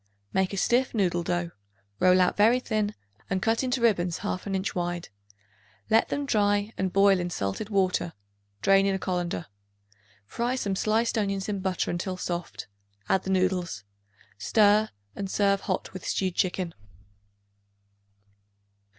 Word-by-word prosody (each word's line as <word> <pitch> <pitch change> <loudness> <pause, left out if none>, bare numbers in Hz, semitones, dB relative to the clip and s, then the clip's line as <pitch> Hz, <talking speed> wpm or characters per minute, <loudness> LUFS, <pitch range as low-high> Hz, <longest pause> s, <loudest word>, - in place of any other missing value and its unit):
Make 190 -1 +1
a 195 - -4
stiff 245 +5 +2
noodle 180 -4 +1
dough; 175 0 -2 0.5
roll 185 0 +5
out 180 - +2
very 225 +4 +5
thin 215 -4 -1 0.3
and 190 - 0
cut 225 +5 +1
into 255 -1 -1
ribbons 180 -7 +2
half 185 - -3
an 195 - -1
inch 190 +2 -2
wide. 175 -1 -3 0.8
Let 225 +1 +4
them 285 - -2
dry 205 -3 +1
and 190 -1 -1
boil 195 0 +5
in 175 0 -2
salted 100 - -3
water; 185 -4 +1 0.5
drain 195 0 +5
in 195 - +1
a - - 0
colander. 175 -3 -2 0.8
Fry 240 - -2
some 200 -6 -1
sliced 225 +3 +1
onions 195 -2 -1
in 205 -2 -2
butter 185 -1 -1
until 185 +2 -3
soft; 175 - -4 0.4
add 190 - +2
the - - -3
noodles. 185 - 0 0.6
Stir 210 - +4 0.3
and 195 -1 -4
serve 200 0 +2
hot - - -3
with 185 - -8
stewed 185 -2 0
chicken. 180 -1 -1
195 Hz, 150 wpm, -27 LUFS, 180-210 Hz, 0.8 s, roll